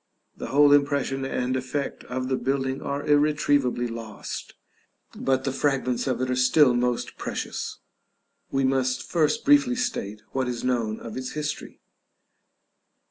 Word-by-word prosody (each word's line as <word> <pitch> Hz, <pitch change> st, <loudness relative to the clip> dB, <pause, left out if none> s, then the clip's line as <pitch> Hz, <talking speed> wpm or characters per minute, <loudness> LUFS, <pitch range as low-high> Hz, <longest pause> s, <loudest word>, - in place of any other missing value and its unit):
The -, -, -6 dB
whole 145 Hz, +4 st, +5 dB
impression 140 Hz, -2 st, +2 dB
and 130 Hz, -1 st, -1 dB
effect 130 Hz, +2 st, -3 dB
of 130 Hz, 0 st, -3 dB
the 130 Hz, -, +1 dB
building 135 Hz, +1 st, -1 dB
are 140 Hz, +1 st, -3 dB
irretrievably 145 Hz, -4 st, +2 dB
lost, 115 Hz, -2 st, -7 dB, 0.6 s
but 130 Hz, -1 st, 0 dB
the 135 Hz, -, -1 dB
fragments 135 Hz, -2 st, 0 dB
of 125 Hz, -2 st, 0 dB
it 130 Hz, 0 st, 0 dB
are -, -, +1 dB
still 130 Hz, +1 st, +5 dB
most 120 Hz, 0 st, -1 dB
precious. -, -, -4 dB, 0.7 s
We 135 Hz, 0 st, 0 dB
must 130 Hz, -1 st, +1 dB
first 155 Hz, -3 st, +1 dB
briefly 280 Hz, -3 st, +5 dB
state 110 Hz, -, -3 dB
what 130 Hz, -1 st, -1 dB
is 120 Hz, -1 st, -3 dB
known 115 Hz, -4 st, 0 dB
of 115 Hz, -, -8 dB
its 130 Hz, 0 st, -5 dB
history. 150 Hz, 0 st, -5 dB
130 Hz, 140 wpm, -25 LUFS, 125-145 Hz, 0.7 s, whole